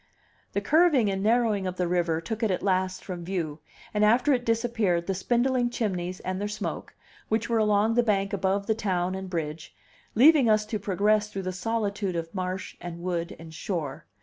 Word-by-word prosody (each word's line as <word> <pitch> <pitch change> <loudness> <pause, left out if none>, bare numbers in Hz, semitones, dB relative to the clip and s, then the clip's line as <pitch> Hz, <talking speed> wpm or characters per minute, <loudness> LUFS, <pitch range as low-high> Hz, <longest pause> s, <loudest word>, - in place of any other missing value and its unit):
The 200 - 0
curving 290 - +4
and 195 0 -2
the 215 - +3
narrowing 225 -5 +2
of 180 - -3
the 180 -1 0
river 170 -2 +1
took 220 +7 -5
it 225 - +2
at 185 - -1
last 185 -1 0
from 180 -3 -5
view; 165 -4 -3 0.3
and 210 0 +2
after 245 +7 +4
it 245 -2 0
disappeared 225 -7 +1
the 195 - -1
spindling 240 +5 +1
chimneys 185 -6 -2
and 185 +1 -3
their 205 - -1
smoke, 210 0 -5 0.3
which 220 +1 0
were 230 -1 +2
along 210 +1 +3
the 240 - +4
bank 200 -4 0
above 195 +1 0
the 220 - +2
town 185 -4 -1
and 190 0 -5
bridge, 160 -2 -4 0.4
leaving 270 0 +6
us 215 0 +3
to 215 0 -3
progress 210 +2 +1
through 195 -2 -5
the 185 - -2
solitude 200 -1 -2
of 165 0 -4
marsh 185 -1 -4
and 170 -1 -7
wood 170 -2 -2
and 160 -1 -11
shore. 155 - -4
200 Hz, 200 wpm, -27 LUFS, 180-225 Hz, 0.4 s, leaving